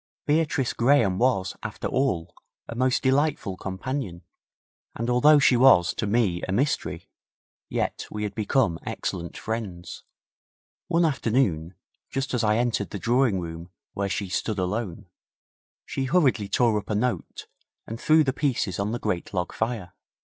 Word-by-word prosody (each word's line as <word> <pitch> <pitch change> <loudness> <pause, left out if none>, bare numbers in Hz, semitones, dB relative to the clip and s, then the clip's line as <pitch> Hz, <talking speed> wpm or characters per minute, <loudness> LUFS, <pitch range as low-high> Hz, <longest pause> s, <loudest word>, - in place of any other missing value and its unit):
Beatrice 150 -4 +1
Graham 115 -7 +3
was, 115 -7 +1
after 105 - -6
all, 90 -11 -1 0.3
a - - -6
most 130 +2 +1
delightful 135 -7 +1
companion, 95 -1 -5 0.7
and 115 +2 -2
although 150 +5 +6
she 135 -3 +5
was 120 -9 +6
to 105 - -2
me 100 -5 +1
a - - -3
mystery, 135 +9 -1 0.6
yet - - -2
we 105 0 -4
had 105 - -3
become 110 -5 +1
excellent 85 -2 -4
friends. 105 -6 -5 0.9
One 170 -1 +3
afternoon, 110 - 0 0.3
just 135 -1 -3
as 125 -2 +1
I 105 0 +3
entered 120 -4 0
the - - -5
drawing 120 +1 +2
room 85 0 -7 0.2
where 100 -1 -2
she 100 +1 -2
stood 100 +4 -2
alone, 95 0 -3 0.8
she 135 - -3
hurriedly 130 - +2
tore 115 -4 +3
up - - -12
a 105 - 0
note, 120 +3 -2 0.4
and 115 +2 -7
threw 155 0 +5
the 135 -2 0
pieces 120 - -1
on 105 +3 -1
the - - -1
great 100 -2 -3
log 90 -1 -2
fire. 110 -6 -3
115 Hz, 150 wpm, -25 LUFS, 95-130 Hz, 0.9 s, although